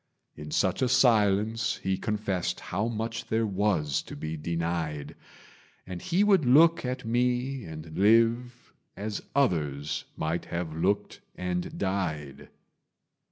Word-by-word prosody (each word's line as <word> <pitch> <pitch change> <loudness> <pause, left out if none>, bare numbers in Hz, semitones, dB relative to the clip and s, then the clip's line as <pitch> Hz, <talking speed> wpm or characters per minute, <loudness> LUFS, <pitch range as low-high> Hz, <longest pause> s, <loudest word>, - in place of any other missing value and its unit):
In 75 0 -8
such 95 - +1
a 130 - +2
silence 110 -3 +3
he 95 0 +1
confessed 105 -3 -2
How 100 +5 -2
much 115 0 -4
there 110 +1 +1
was 95 -8 0
to - - -10
be 80 +2 -4
denied; 80 -2 -3 0.7
And 90 -1 -7
he 180 +4 +2
would 195 -5 +4
look 160 +7 +5
at 125 0 -3
me 125 +1 0
and 80 0 -8
live, 115 +4 +2 0.2
As 105 +1 -4
others 75 - 0
might 80 +2 -2
have 85 -2 -4
looked 100 +5 -1
and 90 -1 -3
died. 85 -8 -3
100 Hz, 125 wpm, -28 LUFS, 85-115 Hz, 0.7 s, look